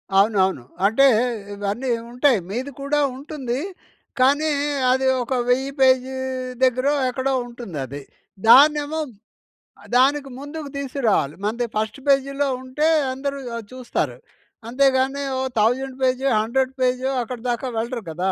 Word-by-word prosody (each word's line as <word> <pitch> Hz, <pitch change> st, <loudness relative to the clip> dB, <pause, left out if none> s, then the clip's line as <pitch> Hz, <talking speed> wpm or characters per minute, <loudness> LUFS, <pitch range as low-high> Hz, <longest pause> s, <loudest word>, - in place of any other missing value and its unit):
అవునవును. 195 Hz, -, +3 dB, 0.2 s
అంటే, 230 Hz, +7 st, +4 dB, 0.5 s
ఇవన్నీ 205 Hz, +6 st, -3 dB, 0.2 s
ఉంటాయి. 250 Hz, -2 st, +3 dB
మీది 255 Hz, +7 st, -4 dB
కూడా 295 Hz, +1 st, 0 dB, 0.2 s
ఉంటుందీ, 270 Hz, -2 st, -4 dB, 0.6 s
కానీ 285 Hz, +4 st, +3 dB, 0.4 s
అదీ 265 Hz, +1 st, +2 dB, 0.2 s
ఒక 250 Hz, -, -3 dB, 0.2 s
1000 265 Hz, +2 st, +1 dB
పేజీ 260 Hz, 0 st, +3 dB, 0.5 s
దగ్గరో 255 Hz, +3 st, +3 dB, 0.2 s
ఎక్కడో 260 Hz, +2 st, -1 dB
ఉంటుందది. 150 Hz, -, -7 dB, 0.5 s
దాన్నేమో 295 Hz, +4 st, +6 dB, 0.8 s
ఆహ్, -, -, -15 dB
దానికి 275 Hz, +2 st, +3 dB
ముందుకు 290 Hz, +1 st, -7 dB
తీసుకురావాలి. 250 Hz, -, 0 dB
మనది 235 Hz, +3 st, -1 dB
ఫస్ట్ 215 Hz, +5 st, -2 dB
పేజీ‌లో 275 Hz, +1 st, +2 dB, 0.2 s
ఉంటే, 280 Hz, +4 st, 0 dB, 0.3 s
అందరూ 275 Hz, +1 st, -4 dB, 0.2 s
ఆహ్, 230 Hz, -, -6 dB
చూస్తారు. 255 Hz, -1 st, -3 dB, 0.5 s
అంతే 265 Hz, +4 st, +2 dB
గానీ, 270 Hz, +2 st, 0 dB
ఓ -, -, -1 dB, 0.2 s
1000 255 Hz, +4 st, +1 dB
పేజో, 260 Hz, +1 st, +1 dB
100 260 Hz, +4 st, 0 dB
పేజో, 255 Hz, +1 st, +1 dB
అక్కడ 250 Hz, +2 st, -6 dB
దాకా 240 Hz, +2 st, -2 dB
వెళ్ళరు 235 Hz, +1 st, -2 dB
కదా! 180 Hz, +4 st, -1 dB
260 Hz, 125 wpm, -22 LUFS, 235-275 Hz, 0.8 s, దాన్నేమో